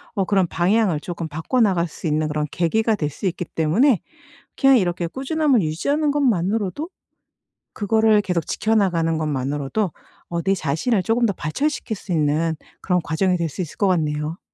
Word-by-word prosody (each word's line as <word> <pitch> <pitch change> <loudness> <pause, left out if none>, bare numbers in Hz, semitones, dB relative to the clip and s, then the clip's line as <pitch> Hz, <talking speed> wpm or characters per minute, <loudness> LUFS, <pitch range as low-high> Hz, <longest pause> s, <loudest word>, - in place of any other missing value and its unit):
어 195 -3 +1
그런 195 -1 +2
방향을 180 -1 +1
조금 170 0 -5
바꿔나갈 175 - +1
수 155 - -11
있는 155 0 +1
그런 150 0 -1
계기가 220 +6 +1
될 150 -7 -2
수 150 - -8
있기 180 0 -3
때문에 185 - +2 0.6
그냥 270 -2 +6
이렇게 175 -3 -1
꾸준함을 270 - +1
유지하는 280 - 0
것만으로도 225 - 0 0.9
그거를 220 0 +3
계속 180 -5 -1
지켜나가는 180 -7 +1
것만으로도 145 +5 -2 0.4
어 170 -1 -2
내 195 +2 +2
자신을 190 - 0
쪼금 230 +4 +2
더 205 - +1
발전시킬 225 - -2
수 185 - -6
있는 160 +1 +1 0.3
그런 180 -1 +1
과정이 180 +4 +1
될 170 -1 -1
수 180 - -5
있을 160 - -8
것 200 - +3
같네요. 155 -2 -1
180 Hz, 365 characters per minute, -22 LUFS, 160-220 Hz, 0.9 s, 그냥